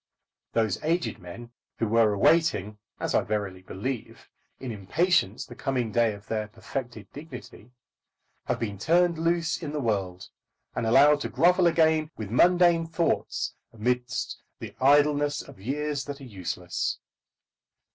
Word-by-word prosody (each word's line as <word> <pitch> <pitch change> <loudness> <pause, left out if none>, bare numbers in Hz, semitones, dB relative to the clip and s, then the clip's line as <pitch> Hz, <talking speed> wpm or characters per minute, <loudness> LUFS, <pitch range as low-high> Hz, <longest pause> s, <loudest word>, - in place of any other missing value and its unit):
Those 110 0 0
aged 170 +2 0
men 115 +7 -10 0.3
who 115 - 0
were 115 0 +4
awaiting, 105 - +2 0.2
as - - -2
I - - +4
verily 100 -3 -3
believe, 110 +6 -6 0.3
in 130 -2 -5
impatience 110 - +1
the - - -11
coming 125 -5 -2
day 115 -1 +2
of 100 0 -14
their 110 -1 -2
perfected 115 +1 -6
dignity, 135 -6 -10 0.8
have - - -1
been 105 -4 -4
turned 170 - +3
loose 170 0 0
in 155 -3 -4
the 150 - -2
world, 95 -7 -2 0.5
and 115 - -1
allowed 145 +5 +6
to - - -3
grovel 180 +1 +4
again 160 -2 +3
with 105 -2 -6
mundane 175 +3 +4
thoughts 165 0 -1 0.2
amidst 125 +3 -2 0.2
the - - -8
idleness 145 +1 +3
of - - -14
years 145 +4 -2
that 145 0 -6
are - - -11
useless. 100 -9 -3
125 Hz, 140 wpm, -27 LUFS, 105-155 Hz, 0.8 s, allowed